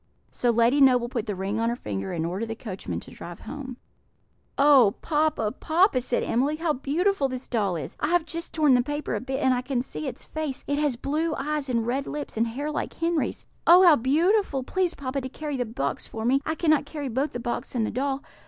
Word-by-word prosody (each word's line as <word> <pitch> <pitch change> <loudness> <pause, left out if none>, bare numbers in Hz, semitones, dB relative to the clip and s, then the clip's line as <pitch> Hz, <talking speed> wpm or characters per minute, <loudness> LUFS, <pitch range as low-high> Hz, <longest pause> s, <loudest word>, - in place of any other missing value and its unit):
So 245 - 0
Lady 235 +4 +3
Noble 250 -3 +5
put 235 -3 -3
the 205 - -2
ring 195 +4 -2
on 230 0 +1
her 235 - -1
finger, 95 - -4
and 165 -1 -2
ordered 190 +7 -3
the 225 - -4
coachman 205 -5 -5
to - - -12
drive - - -9
home. 260 -4 -7 0.8
"Oh, 275 -8 +6
papa, 300 -8 +1
papa!" 320 - +2
said 245 0 0
Emily, 275 +6 +1
"how 320 0 0
beautiful 295 +3 0
this 255 0 -5
doll 205 -7 0
is! 155 -5 -6
I - - 0
have 345 0 +2
just 335 +2 -5
torn 300 -4 +4
the 250 - +5
paper 290 +3 -3
a - - 0
bit, 265 +1 -3
and 260 - +4
I 250 - 0
can 255 -1 -1
see 155 - -6
its - - -6
face; 310 -4 -5
it 285 0 0
has 295 -4 +1
blue 305 +6 -1
eyes 295 0 -2
and 230 -2 0
red 265 +4 -1
lips, 295 -1 -5
and 225 +1 +1
hair 285 +6 -3
like 300 - -3
Henry's. 335 -2 -1 0.2
Oh, 355 +2 +9
how 335 -4 +8
beautiful! 300 - +2
Please, 365 +5 -1
papa, 275 0 -3
to 260 - -5
carry 295 +1 -5
the 250 -2 -1
box 180 - -3
for 220 0 -5
me; 265 +3 +3
I 315 - 0
cannot 310 -3 +2
carry 290 -2 -5
both 265 +5 -1
the 245 - -3
box 240 +1 -4
and 225 -3 +1
the - - -3
doll. 275 +1 -2
270 Hz, 230 wpm, -26 LUFS, 235-300 Hz, 0.8 s, Oh